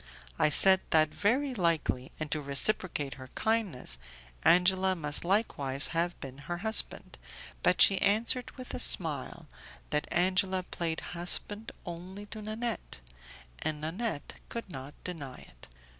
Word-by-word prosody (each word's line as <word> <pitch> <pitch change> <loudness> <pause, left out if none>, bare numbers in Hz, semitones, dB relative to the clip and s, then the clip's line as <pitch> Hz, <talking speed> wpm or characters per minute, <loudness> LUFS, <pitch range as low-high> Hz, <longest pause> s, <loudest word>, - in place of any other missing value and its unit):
I - - +4
said 190 +5 +5
that 155 -1 +3
very 260 +7 0
likely, 165 - -1
and 155 -2 -5
to 155 - -1
reciprocate 145 0 -1
her 130 - -9
kindness, 200 - -1 0.4
Angela 185 +2 +4
must 150 -3 0
likewise 145 -8 +1
have 170 +1 -2
been 135 0 -9
her 175 - -2
husband, 220 0 0 0.4
but - - +3
she 195 - +4
answered, 230 +5 +3
with 255 -1 -8
a - - -4
smile, 165 - +4 0.4
that 150 0 -1
Angela 185 +1 +1
played 165 -2 -4
husband 205 +5 -3
only 180 +3 -8
to 215 - -8
Nanette, 215 - -4 0.6
and 155 -1 -3
Nanette 165 +1 -4
could 230 -5 -6
not 135 +1 -9
deny 145 -8 -7
it. - - -16
175 Hz, 135 wpm, -30 LUFS, 150-205 Hz, 0.6 s, said